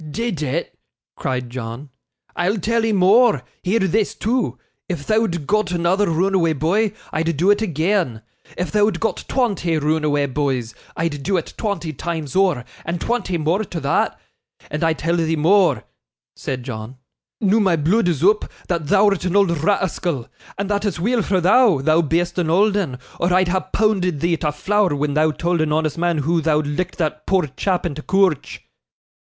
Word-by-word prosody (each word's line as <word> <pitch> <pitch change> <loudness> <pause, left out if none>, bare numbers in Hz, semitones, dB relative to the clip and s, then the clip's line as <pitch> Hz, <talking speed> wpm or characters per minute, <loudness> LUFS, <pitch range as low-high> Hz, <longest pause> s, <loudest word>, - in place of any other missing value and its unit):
'Did 215 -1 -3
it!' 150 +3 -3 0.4
cried 125 -1 -3
John. 125 +3 -6 0.5
'I'll 180 +5 0
tell 230 +4 0
'ee 225 - +1
more; 200 - +4 0.2
hear 190 +5 +1
this, 205 +1 0
too. 220 - -1 0.3
If 175 -5 -3
thou'd 215 -8 0
got 215 +1 +1
another 180 +3 +1
roonaway 170 0 +2
boy, 200 +8 +1 0.2
I'd 165 -1 -1
do 185 +6 +4
it 205 - +2
agean. 165 - 0 0.3
If 180 - -2
thou'd 210 0 +2
got 225 -4 -2
twonty 195 -11 0
roonaway 150 -2 0
boys, 130 -5 -1 0.2
I'd 165 -4 -2
do 190 +6 0
it 165 - -4
twonty 200 -7 -3
times 160 -3 -4
ower, 185 -10 +2 0.2
and 170 +1 -3
twonty 230 -6 -1
more 165 +7 0
to 175 -4 -5
thot; 140 -2 0 0.5
and 150 +3 -2
I 165 0 +3
tell 165 +2 -1
thee 165 -1 +1
more,' 180 +5 +3 0.5
said 130 -2 -4
John, 120 0 -7 0.4
'noo 210 +1 +3
my 190 -5 +3
blood 175 +7 +2
is 165 -4 0
oop, 210 +3 +3 0.2
that 170 -4 -1
thou'rt 200 +1 +3
an 180 +1 -1
old 200 -3 +4
ra'ascal; 170 - -1 0.3
and 200 - -2
that 205 0 -1
it's 205 -5 -2
weel 230 +6 +1
for 190 -2 +1
thou, 210 - +4
thou 155 +5 +3
be'est 170 +3 0
an 170 -3 0
old 200 +5 +3
'un, 165 -11 -1 0.2
or 175 +1 +1
I'd 185 0 +3
ha' 185 +1 -2
poonded 190 -7 +1
thee 170 -1 +1
to 150 -2 -1
flour 190 +2 +1
when 145 0 -1
thou 155 +1 +3
told 170 +2 -1
an 155 -1 0
honest 155 +1 0
mun 175 -1 +1
hoo 165 +1 +1
thou'd 155 -1 +1
licked 165 +5 -3
that 155 -2 -3
poor 190 -4 +2
chap 185 -2 -1
in 170 - -2
t' 150 - -7
coorch. 190 -2 0
175 Hz, 180 wpm, -20 LUFS, 155-200 Hz, 0.5 s, more